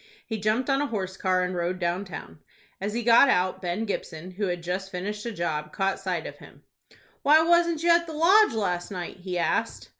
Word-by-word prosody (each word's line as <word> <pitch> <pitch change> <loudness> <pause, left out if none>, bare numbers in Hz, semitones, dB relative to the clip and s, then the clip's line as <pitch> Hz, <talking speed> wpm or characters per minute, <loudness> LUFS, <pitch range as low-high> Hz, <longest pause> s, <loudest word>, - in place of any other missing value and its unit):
He 220 -1 -4
jumped 215 +5 0
on 275 0 +2
a 290 - 0
horse 190 -6 -4
car, 185 -1 +1
and 180 0 -2
rode 175 +1 -2
down 175 +3 -2
town. 80 - -9 0.4
As 205 +2 -3
he 240 - -1
got 240 +4 +6
out, 185 -4 +1
Ben 180 +5 -2
Gibson, 180 -4 -5
who 200 +2 -3
had 175 -1 -3
just 185 +2 -3
finished 205 +4 -5
a - - -3
job, 155 -6 -3
caught 195 0 -1
sight 185 -4 -3
of - - -8
him. - - -16 0.6
"Why 310 +2 +5
wasn't 340 -1 +2
you 340 - +4
at 340 0 +3
the 320 - -7
Lodge 365 - +5
last 180 -5 -1
night?" 180 -3 -6
he 180 -1 -5
asked. 170 - -1
195 Hz, 215 wpm, -26 LUFS, 180-240 Hz, 0.6 s, got